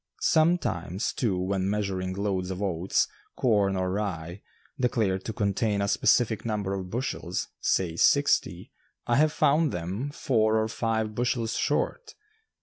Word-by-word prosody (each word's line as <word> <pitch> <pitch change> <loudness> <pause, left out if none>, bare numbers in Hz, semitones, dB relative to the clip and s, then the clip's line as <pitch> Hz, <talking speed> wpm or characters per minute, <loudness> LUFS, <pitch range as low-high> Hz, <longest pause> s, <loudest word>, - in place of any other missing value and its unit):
Sometimes, 155 - +1
too, 105 -7 0
when 95 +1 -1
measuring 95 -3 -2
loads 95 -2 -1
of 95 -1 -4
oats, 95 -2 0 0.3
corn 100 -5 +2
or 95 0 -1
rye, 95 -3 -4 0.4
declared 110 -7 +1
to - - -2
contain 100 0 0
a 100 - 0
specified 110 +2 +2
number 105 -4 -2
of 95 -2 -4
bushels, 120 +6 -3
say 85 -4 0
sixty, - - +2 0.3
I 120 - +2
have 155 +1 +4
found 150 0 +2
them 95 +11 -3
four 110 -6 +1
or 110 0 +1
five 110 -1 -1
bushels 120 0 -1
short. 445 -3 -1
105 Hz, 140 wpm, -27 LUFS, 95-115 Hz, 0.4 s, have